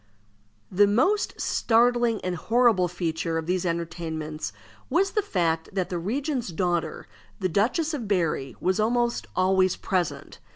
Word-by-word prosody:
The 205 +2 +5
most 375 - +1
startling 240 -1 +2
and 180 -1 -1
horrible 225 -1 +3
feature 165 -2 -2
of 160 - -3
these 180 +1 0
entertainments 160 - -4 0.4
was 390 +4 +2
the 425 - +1
fact 165 - -1
that 190 -2 -1
the 175 - -1
regent's 260 - -2
daughter, 175 -1 -2 0.3
the 190 - +1
Duchess 260 - +1
of 245 -8 -4
Berri, 160 - 0
was 185 +3 0
almost 235 +2 +1
always 185 0 +3
present. 180 -4 -3
185 Hz, 135 wpm, -26 LUFS, 170-235 Hz, 0.4 s, The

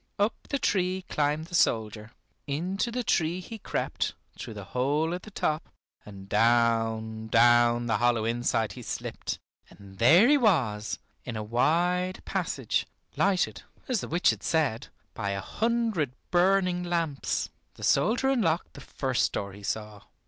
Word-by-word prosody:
Up 205 +3 +2 0.2
the 280 - 0
tree 185 -5 0
climbed 150 +1 0
the 175 - -16
soldier, 110 -8 +1 0.4
into 180 +10 -1
the 245 +1 -2
tree 170 -3 +1
he 220 +5 -8
crept - - -2 0.2
through 110 - -8
the 100 - -7
hole 145 +6 +1
at 180 - -4
the 215 - -11
top, 155 -5 -2 0.4
and 95 -2 -10
down, 115 -1 +2
down 120 +1 +4
the 115 - +1
hollow 120 -2 +2
inside 115 -1 0
he 125 - -9
slipped, - - -4 0.3
and 95 -1 -15
there 165 - +7
he 290 +1 +5
was, 125 - +1 0.3
in 120 - -6
a 110 - -3
wide 175 - +1
passage, - - -1 0.3
lighted, 195 -2 +1 0.3
as 250 -7 0
the - - -5
witch 175 +2 +3
had - - -6
said, 140 -7 0 0.3
by 100 - -3
a - - -3
hundred 225 - -1 0.2
burning 180 0 +3
lamps. 165 -5 -1 0.2
The - - -11
soldier 230 - +2
unlocked 180 -10 0
the 140 - -11
first 130 -2 -1
door 100 -1 -4
he 100 - -12
saw. 105 0 -4
145 Hz, 155 wpm, -28 LUFS, 115-180 Hz, 0.4 s, there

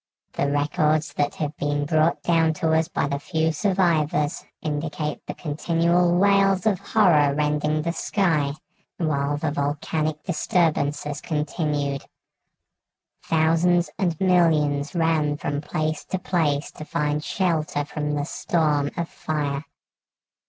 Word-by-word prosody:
The 140 - 0
records 150 +2 +1
that 145 0 -1
have 150 -1 -3
been 145 0 -1
brought 155 +2 +1
down 165 -2 +2
to 160 +1 0
us 160 0 +2
by - - -1
the 140 0 -2
few 160 +1 0
survivors 160 -5 +1 0.2
indicate 150 0 -3
the - - -5
continual 170 +3 +1
wails 195 -1 +3
of 205 -5 +2
horror 155 -10 +3
rending 150 +1 0
the 170 - 0
sky 160 -9 0 0.4
while 145 -3 0
the 150 0 -1
volcanic 150 +2 -2
disturbances 150 -5 0
continued. 150 -3 -2 1.2
Thousands 165 +2 +2
and 175 -5 0
millions 155 -5 +2
ran 160 -3 +1
from 145 -1 -3
place 155 +1 -2
to 190 - -2
place 155 -6 0
to - - -9
find 150 -2 -1
shelter 155 -6 -1
from 150 0 -3
the 145 0 -1
storm 150 -3 0
of 170 -1 -1
fire. 145 -3 -3
155 Hz, 125 wpm, -24 LUFS, 145-170 Hz, 1.2 s, wails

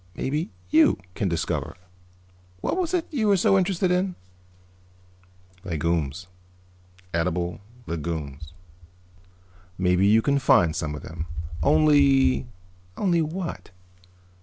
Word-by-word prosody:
Maybe 150 +5 -2 0.2
you 160 - +5 0.2
can 100 - -1
discover 85 -1 -2 0.8
what - - -1
was 360 -3 -1
it 360 -3 0
you 240 -8 0
were 200 -1 +4
so 195 - +3
interested 185 -1 +1
in?" 180 0 0 1.5
"Legumes. 85 -2 -2 0.9
Edible 85 +2 -1 0.2
legumes." 75 -3 -5 1.3
"Maybe 90 +1 +3
you 110 +2 +4
can 140 -1 +2
find 90 - +4
some 75 -2 -3
of - - -9
them. 80 +1 -6 0.3
Only 140 -4 +4 0.2
" 90 0 -31
"Only 175 -4 +2
what?" 165 +3 -4
105 Hz, 110 wpm, -25 LUFS, -, 1.5 s, you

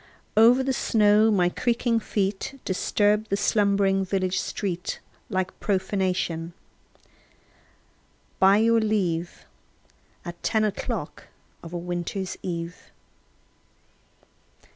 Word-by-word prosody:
Over 235 +4 +6
the 265 0 0
snow 215 -2 +3
my 185 -5 +3
creaking 235 +4 0
feet 205 +5 -3
Disturbed 210 +3 +1
the 200 - 0
slumbering 200 -2 +2
village 185 -1 -1
street 180 -4 -3 0.3
Like 185 -3 -2
profanation, 185 -4 -1 1.9
by 195 +1 +6
your 230 +1 +4
leave, 185 -6 -1 0.8
At 175 0 -8
ten 220 -1 +1
o'clock 210 -2 -4 0.4
of 165 - -10
a 175 - -4
winter 175 +2 -3 0.2
eve. 170 -1 -6
195 Hz, 95 wpm, -25 LUFS, 180-215 Hz, 1.9 s, Over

